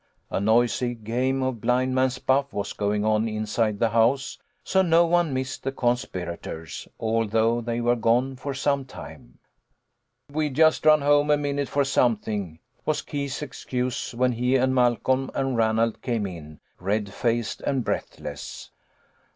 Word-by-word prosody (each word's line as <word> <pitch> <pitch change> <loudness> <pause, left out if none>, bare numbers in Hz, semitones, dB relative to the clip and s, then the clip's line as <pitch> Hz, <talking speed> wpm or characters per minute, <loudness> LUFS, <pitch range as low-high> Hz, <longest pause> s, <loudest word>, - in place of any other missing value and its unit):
A - - 0
noisy 120 +3 +2
game 125 +4 -1
of 130 -4 -2
blind 125 +3 +1
man's 130 0 +1
buff 135 +2 +1
was 100 - -3
going 105 0 -1
on 110 +1 +2
inside 110 0 -1
the 115 +2 +2
house, 120 +5 +2 0.2
so 190 - +2
no 170 -1 +4
one 170 -2 +2
missed 130 +1 -3
the 135 - -2
conspira 120 -10 -2
tors, 80 0 -7
although 115 +1 +1
they 120 0 -2
were 120 +1 +3
gone 120 +3 +1
for 135 +1 -5
some 140 0 0
time. 130 - -12 0.9
"We 155 +1 0
just 155 +3 +3
ran 155 -1 +7
home 145 +1 +3
a 150 - +5
minute 145 -1 -2
for 140 -1 +1
something," 105 -9 0 0.3
was 155 - -1
Keith's 140 0 -4
excuse, 125 -2 -3
when 125 +1 +2
he 125 +2 +1
and 130 0 +2
Malcolm 130 +1 +2
and 135 -1 0
Ranald 115 0 +1
came 115 -4 -1
in, 80 -5 -9 0.2
red 100 +1 -1
faced 120 -1 -1
and 135 -3 0
breathless. - - -5
125 Hz, 155 wpm, -25 LUFS, 110-135 Hz, 0.9 s, ran